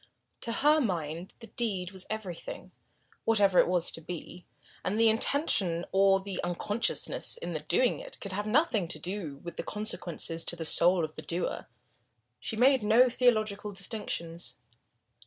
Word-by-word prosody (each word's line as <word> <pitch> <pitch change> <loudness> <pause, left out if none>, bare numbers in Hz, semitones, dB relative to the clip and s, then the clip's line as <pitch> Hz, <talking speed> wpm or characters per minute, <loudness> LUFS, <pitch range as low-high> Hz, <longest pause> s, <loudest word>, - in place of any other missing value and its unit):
To 230 - -3
her 300 +6 +4
mind 170 - -3
the - - -8
deed 195 -7 -2
was 190 -1 -7
everything, 200 -6 -6 0.5
whatever 205 -5 +4
it - - +5
was 175 -1 0
to 165 - -6
be, 175 +1 -8 0.4
and 210 +4 -1
the 225 0 +7
intention 215 - +2
or 195 0 +4
the 195 -1 -3
unconsciousness 205 - 0
in 480 - -5
doing - - +3
it - - -7
could 200 - -4
have 205 +2 -3
nothing 225 - +2
to 175 - -2
do 180 -6 -4
with 170 -1 -8
the - - -3
consequences 175 -5 -3
to - - +1
the 165 -1 -5
soul 175 +1 +4
of 155 - -10
the - - -7
doer. 175 +1 -3 0.7
She - - -3
made 260 +3 +4
no 225 +4 +5
theological 215 -4 +1
distinctions. 180 -4 -3
195 Hz, 155 wpm, -29 LUFS, 175-225 Hz, 0.7 s, the